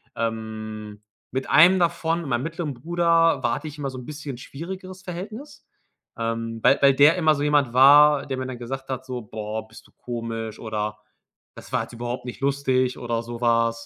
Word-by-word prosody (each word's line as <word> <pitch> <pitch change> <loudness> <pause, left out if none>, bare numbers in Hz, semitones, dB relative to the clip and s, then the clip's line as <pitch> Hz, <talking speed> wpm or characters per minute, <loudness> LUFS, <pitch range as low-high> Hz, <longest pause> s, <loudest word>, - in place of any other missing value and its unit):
Ähm, 110 -2 -5 0.3
mit 130 +1 -3
einem 180 +4 +7
davon 170 -1 0
mit 145 - -6
meinem 120 +2 0
mittleren 165 -3 -4
Bruder, 165 0 +2
war 120 - +2
hatte 155 - -6
ich 150 0 -9
immer 140 -2 -3
so 130 - -8
'n 125 - -10
bisschen 150 -4 -7
schwierigeres 185 +7 -8
Verhältnis, 210 - -8 0.5
ähm, 115 0 -3
weil 140 - +5
weil 140 -1 +6
der 145 +5 +6
immer 155 -3 +3
so 145 - -2
jemand 145 -5 +2
war, 145 +2 +7
der 135 -2 -4
mir 130 - -3
dann 130 -2 -6
gesagt 135 +3 -6
hat, 130 0 -4
so: 125 -2 -5
„Boah, 110 +1 -6
bist 110 - -15
du - - -26
komisch“, 115 -2 -5
oder: 105 -1 -3 0.6
„Das - - -12
war - - +1
jetzt - - -12
überhaupt 120 +1 -5
nicht 120 -5 -7
lustig“, 130 -2 +1
oder 115 -1 -2
sowas. 115 -1 0
130 Hz, 190 wpm, -24 LUFS, 115-150 Hz, 0.6 s, einem